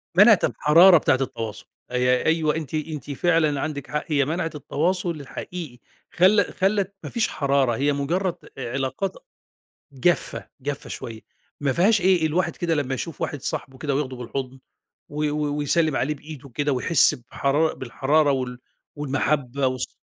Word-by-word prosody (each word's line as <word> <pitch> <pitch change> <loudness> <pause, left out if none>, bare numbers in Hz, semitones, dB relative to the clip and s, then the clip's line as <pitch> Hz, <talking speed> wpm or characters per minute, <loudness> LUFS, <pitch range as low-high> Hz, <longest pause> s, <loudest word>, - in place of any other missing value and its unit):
مَنَعِت - - +7
الحرارة 170 +5 +6
بتاعة 145 - +3
التواصل، 115 -4 -4 0.3
أي 125 0 +2
أيوه 160 -2 +2
أنتِ 160 -3 -5
أنتِ 155 -3 -4
فعلًا 155 -1 +2
عندِك 150 -3 -4
حق، 150 0 -1
هي 145 -4 +2
مَنَعِت 165 +2 -2
التواصل 175 +6 -1
الحقيقي، 155 -1 -7 0.3
خل 200 +4 +5
خلّت 195 0 0
ما - - -5
فيش 235 -2 0
حرارة، 140 -4 +1
هي 145 +4 +1
مجرّد 170 +6 -1 0.2
علاقات 135 +8 -3 0.8
جافة، 140 +6 0
جافة 140 +1 -5
شوية، 115 -2 -7 0.4
ما 140 -2 +1
فيهاش 200 - +3
إيه 180 -3 +3
الواحد 170 +2 0
كده 170 -2 0
لمّا 140 -3 -1
يشوف 160 +4 -6
واحد 145 - -3
صاحبه 130 -1 -4
كده 145 0 -2
وياخده 135 -2 -2
بالحضن، 130 +2 -5 0.5
و 150 +1 -3
و 145 -1 -1
ويسلّم 155 0 +1
عليه 150 +4 0
بإيده 145 -1 -11
كده، 145 +4 -1
ويحس 130 +4 +3
بحرار 140 +5 0
بالحرارة 145 +4 +1
وال 125 -2 -3 0.4
والمَحبّة 140 -2 0
والص 130 -1 -2
145 Hz, 150 wpm, -24 LUFS, 135-165 Hz, 0.8 s, مَنَعِت